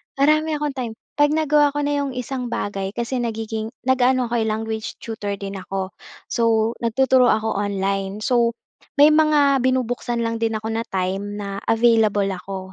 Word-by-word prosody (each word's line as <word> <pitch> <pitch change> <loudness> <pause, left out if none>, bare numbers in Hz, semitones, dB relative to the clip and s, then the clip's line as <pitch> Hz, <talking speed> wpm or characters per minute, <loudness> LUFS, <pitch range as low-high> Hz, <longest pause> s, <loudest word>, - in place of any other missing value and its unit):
Marami 305 +3 +3
akong 295 -1 -2
time, 250 -4 -4 0.3
'pag 290 - +6
nagawa 295 -2 +3
ko 290 - 0
na 290 - 0
'yong 275 -2 -3
isang 250 0 -4
bagay, 195 -3 -3
kasi 240 +2 -2
nagiging 225 -1 -3 0.2
nag-aano 255 -1 +2
ako 240 - +1
eh, 220 - 0
language 220 0 -3
tutor 205 -3 -4
din 195 -1 -6
ako. 190 +1 -4 0.4
So 230 -1 +2
nagtuturo 255 +2 +3
ako 220 -3 +1
online. 195 0 -2
So 235 -2 +2 0.4
may 295 +1 +7
mga 300 -3 +4
binubuksan 245 -2 0
lang 230 0 -2
din 225 -1 0
ako 220 +1 -3
na 230 +1 -3
time 195 +2 -2
na 200 -1 -5
available 225 -3 +3
ako. 190 +1 -6
230 Hz, 165 wpm, -22 LUFS, 205-260 Hz, 0.4 s, may